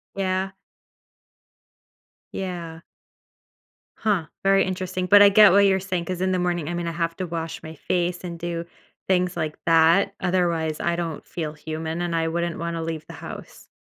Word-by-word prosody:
Yeah. 190 Hz, 0 st, -1 dB, 1.8 s
Yeah. 170 Hz, -3 st, -5 dB, 1.1 s
Huh, 195 Hz, -8 st, 0 dB, 0.2 s
very 195 Hz, 0 st, +4 dB
interesting, 185 Hz, 0 st, -3 dB
but 205 Hz, +1 st, +8 dB
I 200 Hz, -, +9 dB
get 210 Hz, -2 st, +8 dB
what 200 Hz, +1 st, +6 dB
you're 190 Hz, -1 st, +3 dB
saying 180 Hz, -3 st, -3 dB
'cause 185 Hz, 0 st, -4 dB
in 185 Hz, 0 st, +1 dB
the 185 Hz, -, +1 dB
morning 175 Hz, -3 st, -1 dB
I -, -, -2 dB
mean, 170 Hz, -1 st, -3 dB
I -, -, -1 dB
have 165 Hz, 0 st, -2 dB
to 185 Hz, -2 st, -3 dB
wash 165 Hz, -1 st, -5 dB
my 160 Hz, 0 st, -8 dB
face 175 Hz, +2 st, -1 dB
and 170 Hz, -1 st, -5 dB
do 170 Hz, 0 st, -4 dB, 0.4 s
things 180 Hz, -1 st, +1 dB
like 155 Hz, -2 st, -2 dB
that. 165 Hz, +4 st, +4 dB
Otherwise, 170 Hz, -4 st, 0 dB
I 170 Hz, 0 st, 0 dB
don't 165 Hz, -3 st, -4 dB
feel 155 Hz, -3 st, -5 dB
human, 160 Hz, +2 st, -5 dB
and 170 Hz, -1 st, -1 dB
I 165 Hz, 0 st, +1 dB
wouldn't 170 Hz, 0 st, -2 dB
wanna 170 Hz, -1 st, -3 dB
leave 160 Hz, -1 st, -4 dB
the -, -, -9 dB
house. -, -, -10 dB
175 Hz, 175 wpm, -24 LUFS, 165-185 Hz, 1.8 s, I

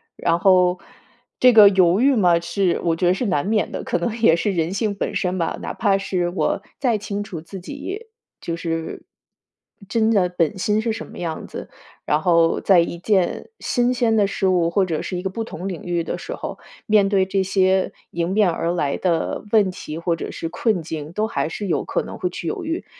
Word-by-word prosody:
然 170 Hz, 0 st, +1 dB
后 180 Hz, -1 st, +4 dB, 0.6 s
这 250 Hz, -, +7 dB
个 215 Hz, -3 st, +9 dB
犹 185 Hz, 0 st, +3 dB
豫 275 Hz, +2 st, +4 dB
嘛， 175 Hz, -6 st, +4 dB
是， 170 Hz, +2 st, 0 dB
我 165 Hz, -1 st, +1 dB
觉 175 Hz, +1 st, +1 dB
得 180 Hz, -, +4 dB
是 245 Hz, -, -2 dB
难 180 Hz, -7 st, 0 dB
免 215 Hz, 0 st, 0 dB
的， -, -, -5 dB
可 -, -, -1 dB
能 195 Hz, +6 st, -2 dB
也 165 Hz, -7 st, +6 dB
是 205 Hz, +4 st, 0 dB
人 170 Hz, -1 st, -1 dB
性 205 Hz, 0 st, -1 dB
本 -, -, -3 dB
身 185 Hz, -1 st, -1 dB
吧， 165 Hz, -, -1 dB
哪 -, -, -4 dB
怕 200 Hz, -3 st, +2 dB
是 185 Hz, -3 st, -1 dB
我 190 Hz, +2 st, -1 dB, 0.2 s
再 240 Hz, -5 st, +2 dB
清 205 Hz, 0 st, -4 dB
楚 175 Hz, -6 st, -7 dB
自 190 Hz, +4 st, -9 dB
己， 365 Hz, -, -7 dB, 0.3 s
就 170 Hz, -, -4 dB
是， 165 Hz, -1 st, -4 dB, 0.9 s
真 225 Hz, +1 st, +2 dB
的 190 Hz, -5 st, +3 dB
本 175 Hz, +2 st, 0 dB
心 210 Hz, +3 st, +1 dB
是 225 Hz, -1 st, -1 dB
什 -, -, -6 dB
么 -, -, -12 dB
样 165 Hz, -2 st, -4 dB
子， -, -, -8 dB, 0.4 s
然 150 Hz, +1 st, +1 dB
后 165 Hz, -1 st, +3 dB
在 190 Hz, -3 st, +5 dB
一 170 Hz, 0 st, 0 dB
件 190 Hz, -2 st, 0 dB
新 245 Hz, -1 st, +1 dB
鲜 235 Hz, -2 st, +1 dB
的 210 Hz, -2 st, +4 dB
事 195 Hz, -1 st, -1 dB
物 175 Hz, -2 st, +2 dB
或 190 Hz, +2 st, +2 dB
者 160 Hz, -3 st, -2 dB
是 180 Hz, -, -4 dB
一 180 Hz, -, -5 dB
个 190 Hz, -, -1 dB
不 225 Hz, +3 st, -3 dB
同 190 Hz, -3 st, -6 dB
领 180 Hz, -4 st, -5 dB
域 175 Hz, -1 st, -1 dB
的 -, -, -4 dB
时 -, -, -6 dB
候， -, -, -7 dB, 0.3 s
面 210 Hz, -3 st, +4 dB
对 195 Hz, -2 st, +3 dB
这 190 Hz, +1 st, 0 dB
些 190 Hz, 0 st, +2 dB, 0.2 s
迎 170 Hz, 0 st, -2 dB
面 200 Hz, -1 st, +3 dB
而 170 Hz, 0 st, -1 dB
来 145 Hz, -5 st, 0 dB
的 170 Hz, 0 st, -1 dB
问 205 Hz, -4 st, +4 dB
题 155 Hz, -3 st, -7 dB
或 170 Hz, 0 st, 0 dB
者 165 Hz, -, -6 dB
是 165 Hz, -, -5 dB
困 185 Hz, 0 st, 0 dB
境， 155 Hz, -1 st, -6 dB
都 210 Hz, +4 st, -1 dB
还 190 Hz, -7 st, -2 dB
是 205 Hz, -, -5 dB
有 170 Hz, -, 0 dB
可 -, -, -2 dB
能 -, -, -8 dB
会 180 Hz, -, -1 dB
去 170 Hz, -1 st, -6 dB
犹 -, -, -3 dB
豫。 325 Hz, +1 st, -3 dB
185 Hz, 240 characters per minute, -21 LUFS, 170-210 Hz, 0.9 s, 个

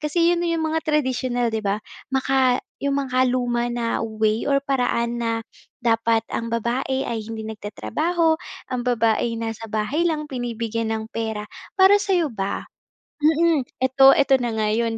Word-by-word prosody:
kasi 335 Hz, +3 st, +2 dB
yun 345 Hz, -, 0 dB
yung 330 Hz, -1 st, 0 dB
mga 320 Hz, +1 st, 0 dB
traditional 255 Hz, -5 st, 0 dB
di 220 Hz, -, -1 dB
ba, 200 Hz, -1 st, 0 dB, 0.3 s
maka 265 Hz, -1 st, +2 dB, 0.2 s
yung 280 Hz, 0 st, 0 dB
makaluma 250 Hz, -2 st, +1 dB
na 240 Hz, -1 st, -1 dB
way 220 Hz, +1 st, 0 dB
or 275 Hz, 0 st, +2 dB
paraan 240 Hz, -3 st, 0 dB
na 230 Hz, -1 st, 0 dB, 0.5 s
"dapat 225 Hz, 0 st, +2 dB
ang 230 Hz, -, -2 dB
babae 245 Hz, +4 st, -1 dB
ay 230 Hz, -2 st, -3 dB
hindi 220 Hz, 0 st, -6 dB
nagtatrabaho, 315 Hz, -, -1 dB, 0.3 s
ang 250 Hz, -, -1 dB
babae 230 Hz, -1 st, +1 dB
nasa 225 Hz, 0 st, -5 dB
bahay 240 Hz, +11 st, 0 dB
lang 305 Hz, -1 st, -1 dB
binibigyan 230 Hz, -4 st, -3 dB
ng 220 Hz, 0 st, -3 dB
pera." 220 Hz, -2 st, -3 dB, 0.3 s
Para 390 Hz, +2 st, +6 dB
sayo 360 Hz, -8 st, +1 dB
ba, 195 Hz, -2 st, -3 dB, 0.6 s
mm, 320 Hz, -1 st, +3 dB, 0.2 s
ito 260 Hz, +1 st, +4 dB
ito 275 Hz, -1 st, +4 dB
na 240 Hz, -, 0 dB
nga 215 Hz, -, +1 dB
yun 230 Hz, 0 st, 0 dB
245 Hz, 150 wpm, -23 LUFS, 225-280 Hz, 0.6 s, Para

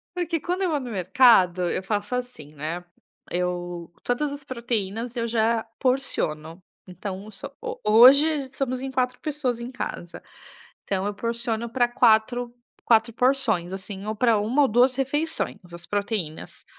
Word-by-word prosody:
Porque 340 Hz, -2 st, -1 dB
quando 360 Hz, +5 st, -2 dB
eu 360 Hz, -, +1 dB
vou 295 Hz, -2 st, 0 dB
no 250 Hz, -, -6 dB
mercado, 185 Hz, -2 st, +4 dB
eu 185 Hz, -, -2 dB
faço 205 Hz, +4 st, -2 dB
assim, 245 Hz, -, -6 dB
né. 160 Hz, +4 st, -5 dB, 0.5 s
Eu 175 Hz, -1 st, -3 dB
todas 280 Hz, +4 st, -1 dB
as 285 Hz, 0 st, -7 dB
proteínas 235 Hz, -2 st, -3 dB
eu 230 Hz, 0 st, -1 dB
já 225 Hz, 0 st, +1 dB
porciono. 180 Hz, -, -1 dB, 0.2 s
Então, 190 Hz, +2 st, -7 dB
um -, -, -10 dB
so 205 Hz, -, -8 dB
ho -, -, -5 dB
hoje 270 Hz, +6 st, +6 dB
somos 255 Hz, -2 st, -2 dB
em 270 Hz, -, -4 dB
4 250 Hz, -1 st, -1 dB
pessoas 270 Hz, -6 st, -2 dB
em 240 Hz, +2 st, -6 dB
casa, 175 Hz, -8 st, -6 dB, 0.6 s
então 190 Hz, -1 st, -1 dB
eu 205 Hz, -, -2 dB
porciono 235 Hz, +1 st, -2 dB
pra 245 Hz, 0 st, +1 dB
quatro 240 Hz, +1 st, +2 dB, 0.3 s
quatro 225 Hz, 0 st, +4 dB
porções, 240 Hz, -8 st, +1 dB
assim, 195 Hz, +1 st, -7 dB
ou 215 Hz, -, -2 dB
pra 225 Hz, -1 st, +3 dB
1 240 Hz, +8 st, +2 dB
ou 275 Hz, -, +4 dB
2 250 Hz, +4 st, +4 dB
refeições, 295 Hz, +4 st, -2 dB
as 170 Hz, 0 st, -10 dB
proteínas. 200 Hz, -6 st, -3 dB
230 Hz, 155 wpm, -25 LUFS, 190-255 Hz, 0.6 s, hoje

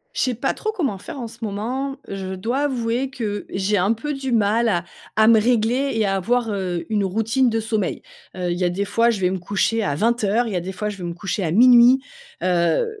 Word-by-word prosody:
Je -, -, 0 dB
sais 255 Hz, -2 st, 0 dB
pas 235 Hz, -, -1 dB
trop 435 Hz, -, -3 dB
comment 285 Hz, -, -2 dB
faire 275 Hz, -, -8 dB
en 235 Hz, -, -4 dB
ce 230 Hz, +1 st, -14 dB
moment. 245 Hz, +7 st, -3 dB
Je 190 Hz, -1 st, -5 dB
dois 230 Hz, +8 st, -2 dB
avouer 245 Hz, -1 st, -1 dB
que 215 Hz, -6 st, -4 dB
j'ai 195 Hz, +2 st, 0 dB
un 195 Hz, +5 st, +2 dB
peu 295 Hz, +7 st, -4 dB
du 270 Hz, -2 st, -4 dB
mal 225 Hz, +1 st, +2 dB
à 175 Hz, -5 st, 0 dB, 0.3 s
à 220 Hz, 0 st, +5 dB
me 225 Hz, -1 st, +7 dB
régler 245 Hz, +4 st, +1 dB
et 220 Hz, -1 st, +1 dB
à 195 Hz, -1 st, +1 dB
avoir, 230 Hz, +4 st, 0 dB
heu, 185 Hz, -4 st, -3 dB
une 210 Hz, -2 st, +1 dB
routine 225 Hz, +6 st, +1 dB
de 225 Hz, 0 st, 0 dB
sommeil. 220 Hz, -1 st, -2 dB, 0.3 s
Heu, 180 Hz, -1 st, -1 dB
il 175 Hz, -, -3 dB
y -, -, 0 dB
a 175 Hz, -, +2 dB
des 200 Hz, +3 st, -2 dB
fois, 230 Hz, +4 st, +2 dB
je 225 Hz, -4 st, 0 dB
vais 180 Hz, -1 st, +1 dB
me 190 Hz, -, -2 dB
coucher 205 Hz, +5 st, 0 dB
à 170 Hz, -9 st, -1 dB
20:00, 230 Hz, +3 st, +1 dB
il 215 Hz, -, -4 dB
y -, -, -2 dB
a 175 Hz, -, 0 dB
des 185 Hz, -, -5 dB
fois, 210 Hz, +3 st, -3 dB
je 205 Hz, -, -7 dB
vais 180 Hz, -, -8 dB
me 170 Hz, -, -3 dB
coucher 190 Hz, +1 st, -3 dB
à 165 Hz, -, -1 dB
00:00. 245 Hz, +5 st, +7 dB, 0.4 s
Heu, 180 Hz, -, +1 dB
220 Hz, 250 wpm, -22 LUFS, 190-240 Hz, 0.4 s, me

